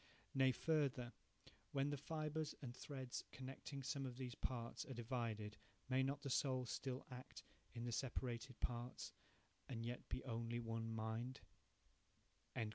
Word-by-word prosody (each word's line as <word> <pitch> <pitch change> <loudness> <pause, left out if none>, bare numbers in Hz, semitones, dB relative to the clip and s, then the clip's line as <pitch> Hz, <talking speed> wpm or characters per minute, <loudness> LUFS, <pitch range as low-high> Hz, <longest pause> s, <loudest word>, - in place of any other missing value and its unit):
Nay, 135 -1 +7
further, 135 -5 +3 0.6
when 140 +1 +4
the - - +3
fibres 155 +1 0
and 120 -2 -3
threads 130 -2 -2
connecting 135 +1 -4
some 140 +1 +1
of 125 -2 -2
these 125 -2 -2
parts 120 +1 -1
are 135 -4 -4
divided, 115 -3 0 0.3
may 130 0 +6
not 140 +2 +2
the 140 - 0
soul 130 -1 +4
still 130 +2 -1
act 125 0 -6 0.3
in 115 - -1
the 120 - +1
separated 125 0 0
parts, 120 +1 0 0.6
and 115 -3 -1
yet 120 +1 -2
be - - 0
only 115 -1 +1
one 115 -1 0
mind?" 115 +3 0
125 Hz, 140 wpm, -46 LUFS, 120-135 Hz, 0.6 s, Nay